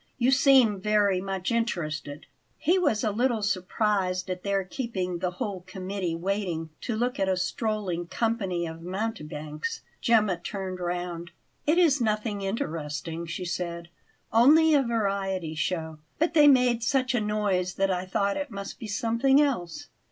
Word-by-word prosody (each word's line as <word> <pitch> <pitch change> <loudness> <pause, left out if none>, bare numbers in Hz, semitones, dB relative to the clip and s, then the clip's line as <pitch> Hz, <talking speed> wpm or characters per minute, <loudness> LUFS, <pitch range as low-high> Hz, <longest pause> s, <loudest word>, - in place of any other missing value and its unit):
"You 255 0 +3
seem 260 -7 +5
very 205 -2 +2
much 195 +1 -3
interested." 155 -11 -2 0.3
He 355 +5 +2
was 230 -12 +1
a 215 - +1
little 235 0 +1
surprised 185 -1 0
at 180 0 -4
their 200 0 0
keeping 185 -4 -3
the 180 0 0
whole 200 -7 -3
committee 185 -2 -3
waiting 175 -3 -2
to 235 - -2
look 245 +4 -1
at 195 - +1
a 185 - +1
strolling 180 -2 -2
company 195 -6 -1
of 165 0 -7
mountebanks. 155 -6 -4 0.2
Gemma 215 -6 +3
turned 185 +1 -5
round. 175 -1 -3 0.4
"It 310 +3 +4
is 305 -7 +4
nothing 215 -2 -1
interesting," 165 -4 -3
she 175 +2 -4
said; 170 -1 -4 0.4
"only 305 +8 +6
a 285 - +5
variety 195 -8 -1
show; 160 -1 -3 0.2
but 330 +2 +1
they 300 -3 +7
made 250 -4 +5
such 260 +2 +1
a 240 - +1
noise 205 -4 0
that 195 0 +1
I 185 0 -2
thought 200 +1 0
it 290 0 -3
must 200 0 -7
be 225 - -6
something 230 +6 +2
else." 285 - -1
195 Hz, 155 wpm, -27 LUFS, 180-230 Hz, 0.4 s, they